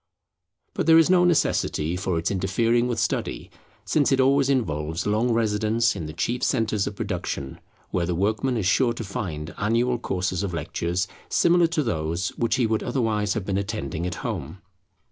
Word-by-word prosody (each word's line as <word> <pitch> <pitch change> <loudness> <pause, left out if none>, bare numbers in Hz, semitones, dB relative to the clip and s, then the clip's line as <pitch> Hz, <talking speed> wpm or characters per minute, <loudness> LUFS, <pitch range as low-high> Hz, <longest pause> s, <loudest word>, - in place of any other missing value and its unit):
But - - -2
there 160 0 +8
is 165 +2 +5
no 180 -1 +5
necessity 90 - +1
for 90 -2 -1
its 80 +3 -1
interfering 115 +5 +1
with 120 -2 -2
study, 115 - -2 0.3
since 145 -3 +2
it 135 - +3
always 135 +1 +3
involves 80 - -1
long 110 +4 +1
residence 110 0 +1
in 85 -5 -5
the 75 - -7
chief 120 +10 -2
centres 110 -5 +1
of 100 - -5
production, 85 -9 -4 0.3
where 85 -2 0
the 90 - -1
workman 110 +7 0
is 105 - -1
sure 120 +5 +3
to 120 - -6
find 85 -7 -5
annual 120 +3 +1
courses 95 -4 -2
of 95 -4 -3
lectures 85 +3 -2 0.2
similar 170 0 +4
to 160 -2 0
those 85 - -1
which 115 - -1
he 125 - +2
would 110 -1 0
otherwise 110 -5 0
have 105 -4 -3
been 95 -1 0
attending 100 -5 -3
at 90 - -4
home. 95 - -5
105 Hz, 180 wpm, -24 LUFS, 90-120 Hz, 0.3 s, there